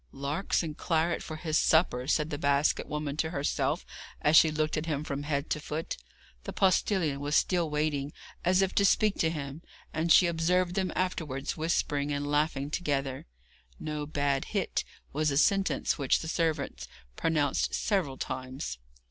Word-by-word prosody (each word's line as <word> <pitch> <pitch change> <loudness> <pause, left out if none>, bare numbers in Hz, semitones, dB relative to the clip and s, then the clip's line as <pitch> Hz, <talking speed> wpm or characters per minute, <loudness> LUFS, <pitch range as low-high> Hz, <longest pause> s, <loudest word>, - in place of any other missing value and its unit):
'Larks 145 +8 -1
and 155 -2 -5
claret 165 +1 0
for 155 - -6
his 155 0 0
supper,' 135 -6 +3
said 155 +1 +1
the 145 - -3
basket 140 0 +2
woman 150 -1 -3
to 160 0 0
herself 145 -3 -1 0.3
as 150 +2 +3
she 160 - +8
looked 155 0 -1
at 155 +2 -3
him 150 -2 -1
from 140 -2 -4
head 145 0 -2
to 150 - +1
foot. 155 +2 -4 0.5
The - - -4
postillion 185 -6 +2
was 145 +1 -1
still 175 -3 +2
waiting, 150 -1 -1 0.3
as 185 +2 +4
if 190 - -1
to 200 - +3
speak 210 +1 +3
to 160 - +3
him, 145 -1 -5 0.3
and 160 +2 0
she 180 - +8
observed 175 +2 +1
them 190 -1 0
afterwards 155 -7 -2
whispering 150 -3 0
and 145 0 -2
laughing 145 -1 0
together. 135 - -2 0.5
'No 150 -1 -4
bad 140 -2 0
hit,' 200 -4 -1 0.3
was 155 +1 +1
a 140 - 0
sentence 195 +1 +2
which 135 -2 +2
the 160 - -6
servant 155 - -1 0.3
pronounced 150 - +1
several 180 - 0
times. 130 - -5
155 Hz, 165 wpm, -29 LUFS, 140-165 Hz, 0.5 s, she